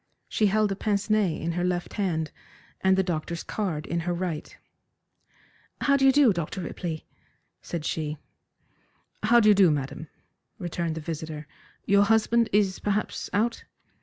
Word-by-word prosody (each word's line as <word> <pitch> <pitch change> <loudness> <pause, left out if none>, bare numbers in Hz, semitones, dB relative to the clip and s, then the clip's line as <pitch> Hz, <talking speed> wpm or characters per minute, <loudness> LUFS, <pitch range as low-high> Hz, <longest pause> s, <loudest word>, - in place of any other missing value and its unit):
She 215 - +2
held 210 +1 +2
a - - -1
pince 205 +1 -1
nez 215 -3 +4
in 165 - -2
her 175 +1 -1
left 180 -1 -1
hand, 165 -7 -1 0.5
and 190 0 +4
the 190 - +3
doctor's 170 -1 -3
card 175 -8 -3
in 170 - -2
her 175 +1 -1
right. 170 -3 -4 1.2
"How 280 - +4
do 270 -1 +4
you - - +8
do, 270 -5 +5
Dr. 170 +2 -4
Ripley?" 165 -2 -5 0.6
said 165 -3 -5
she. 155 -2 -2 1.0
"How 235 +3 +5
do 215 - +4
you - - +8
do, 195 -3 +6
madam?" 150 +1 -3 0.5
returned 170 -2 -3
the 160 - -5
visitor. 155 -1 -5 0.4
"Your 200 0 +5
husband 225 +1 +3
is 195 -2 +2
perhaps 210 +1 -2
out?" 230 +3 0
185 Hz, 160 wpm, -26 LUFS, 165-210 Hz, 1.2 s, you